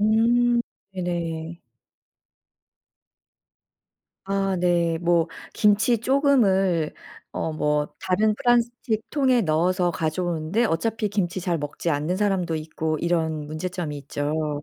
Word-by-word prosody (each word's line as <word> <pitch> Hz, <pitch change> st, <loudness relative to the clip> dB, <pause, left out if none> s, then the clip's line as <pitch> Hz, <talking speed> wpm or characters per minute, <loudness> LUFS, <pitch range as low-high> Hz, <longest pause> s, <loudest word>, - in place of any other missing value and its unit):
음. 235 Hz, +3 st, +3 dB, 0.3 s
네네. 170 Hz, -2 st, -4 dB, 2.6 s
아 195 Hz, -1 st, 0 dB
네. 170 Hz, -2 st, +1 dB
뭐 170 Hz, -1 st, +2 dB, 0.3 s
김치 210 Hz, +3 st, +3 dB
조금을 210 Hz, -, +2 dB, 0.4 s
어 160 Hz, -, -2 dB
뭐 150 Hz, -1 st, 0 dB
다른 210 Hz, +3 st, +2 dB
플라스틱 240 Hz, -3 st, 0 dB
통에 260 Hz, -5 st, +3 dB
넣어서 175 Hz, +2 st, +1 dB
가져오는데 165 Hz, +5 st, -1 dB
어차피 220 Hz, +3 st, 0 dB
김치 190 Hz, -2 st, -1 dB
잘 175 Hz, -2 st, -1 dB
먹지 145 Hz, +3 st, -3 dB
않는 150 Hz, +5 st, 0 dB
사람도 190 Hz, -4 st, 0 dB
있고 155 Hz, 0 st, -3 dB
이런 160 Hz, -3 st, -1 dB
문제점이 155 Hz, 0 st, -4 dB
있죠. 150 Hz, +1 st, -3 dB
180 Hz, 215 characters per minute, -24 LUFS, 160-210 Hz, 2.6 s, 음